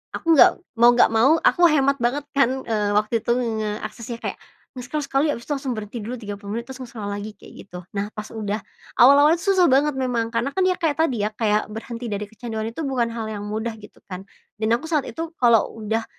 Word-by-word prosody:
aku 330 -1 +2
nggak 365 - +8 0.3
mau 240 +1 +8
nggak 240 - +5
mau, 230 +6 +5
aku 350 - +4
hemat 280 -2 +2
banget 260 +5 +1 0.2
kan, 265 0 +2
eee, 210 -2 0
waktu 215 +2 +1
itu 235 - 0
ngeaksesnya 220 0 -4
kayak, - - -4 0.4
nge-scroll 255 +5 -4
sekali 280 +3 +1
abis 235 - -8
itu - - +1
langsung 270 -3 -3
berhenti 215 +2 -6
dulu 245 - -4
30 205 0 -7
menit, 235 - -5
terus 265 - -7
nge-scroll 225 -5 -7
lagi, 205 +1 -5
kayak - - -15
gitu. 180 -1 -8 0.2
Nah, 205 +1 -2
pas 215 0 -7
udah 215 -1 -4 0.4
awal-awalnya 285 +6 +6
susah 385 -3 +3
banget 280 +1 +3
memang, 240 -3 -1
karena 240 +4 0
kan 380 - +1
dia 370 0 +2
kayak 320 -3 0
tadi 245 -10 0
ya, 210 - 0
kayak 210 -1 +1
berhenti 230 +2 -7
dari 205 0 -3
kecanduan 220 -1 -5
itu 280 +8 -7
bukan 245 -4 0
hal 230 -1 -4
yang 205 -1 -5
mudah, 220 +2 -3
gitu 210 - -15
kan. 185 0 -6 0.4
Dan 220 +1 +1
aku 295 - -10
saat 300 -4 +1
itu 330 0 -6
kalau 235 -3 +4
udah 225 +1 -1
235 Hz, 215 wpm, -22 LUFS, 215-275 Hz, 0.4 s, nggak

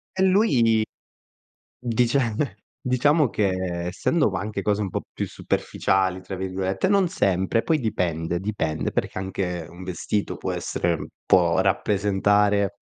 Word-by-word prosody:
E 190 - +2
lui 135 - +4 1.0
dice 120 +2 +1 0.7
diciamo 145 +3 +3
che, 95 -4 -1
essendo 125 - +1
anche 100 +2 -3
cose 105 +1 0
un 100 - -2
po' - - -3
più - - -2
"superficiali" 95 -1 0
tra 95 +1 -6
virgolette, 95 - -1
non 200 -2 +4
sempre, 95 - +1
poi 160 -2 +2
dipende 85 - -1
dipende, 95 -6 -2
perché - - -2
anche 95 -3 -3
un 90 +2 -11
vestito 95 +3 -2
può - - -3
essere 85 -1 -2 0.2
può 85 -1 +4
rappresentare 100 +1 +2
100 Hz, 125 wpm, -24 LUFS, 95-115 Hz, 1.0 s, lui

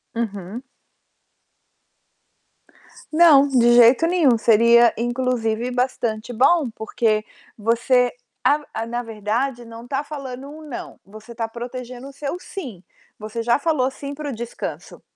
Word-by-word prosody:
Uhum. 210 0 -4 2.5
Não, 310 -4 +7
de 240 -3 +4
jeito 245 +7 +6
nenhum. 320 -9 +3
Seria, 235 +1 +5
inclusive 240 -1 -1
bastante 245 -3 -2
bom, 265 +4 +3
porque 220 -1 -1 0.3
você 240 +3 +2 0.3
a 295 +1 +3
a 225 - -3
na 240 +1 -3
verdade, 230 +3 -3
não 230 +1 -11
tá 270 +2 -1
falando 275 -3 -7
um 305 +2 -11
"não", 250 - -8
você 215 +3 -13
tá 230 - -2
protegendo 245 +2 -8
o 280 - -11
seu 280 +4 -4
"sim". 265 - -8 0.4
Você 215 +2 -5
já 235 +3 +2
falou 280 -4 0
"sim" 280 +1 -7
para 300 0 -5
o - - -4
descanso. 235 +1 -7
240 Hz, 130 wpm, -21 LUFS, 230-275 Hz, 2.5 s, Não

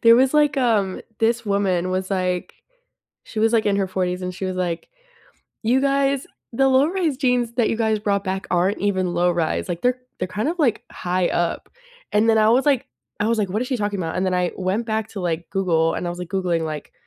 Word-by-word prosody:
there 230 0 +8
was 260 +2 +4
like, 295 -2 +4
um 215 -7 +1 0.2
this 230 +1 +1
woman 190 -3 0
was 185 +1 -2
like 180 -2 -1 0.7
she 215 - -6
was 225 +1 +3
like 220 -2 +3
in 205 - +2
her 195 -1 0
40s, 185 -1 -2
and 180 0 -4
she 190 +1 -5
was 185 0 -3
like, 175 -2 -2 0.8
"You 250 +4 +3
guys, 275 -1 +1 0.3
the 270 +3 +3
low-rise 300 +2 +2
jeans 250 -3 +1
that 235 -2 +2
you - - 0
guys 220 -2 +1
brought 200 -1 0
back 190 0 -3
aren't 180 +3 +2
even 190 -3 0
low-rise, 175 -1 +1
like, 175 -1 -4
they're 250 0 +2 0.2
they're 185 - -1
kind 210 +7 -2
of 340 +3 -1
like 245 -8 +2
high 180 0 0
up." 170 -1 -1 0.5
And 215 +2 +4
then 220 - +4
I 215 0 +5
was 255 +5 +3
like 275 -4 +2 0.3
I 210 - +1
was 230 0 +1
like, 200 -3 0
"What 215 +5 -1
is 250 - -2
she 265 - 0
talking 205 -2 -2
about?" 165 -2 -3
And 185 - 0
then 185 - 0
I 180 -1 +1
went 190 +5 -1
back 220 -1 -2
to, 205 - -7
like, 170 -2 -2
Google 165 -4 +1
and - - -3
I - - -1
was 175 - -6
like 180 -1 -6
googling, 180 -4 0
like, 155 -2 -5
200 Hz, 230 wpm, -22 LUFS, 180-235 Hz, 0.8 s, there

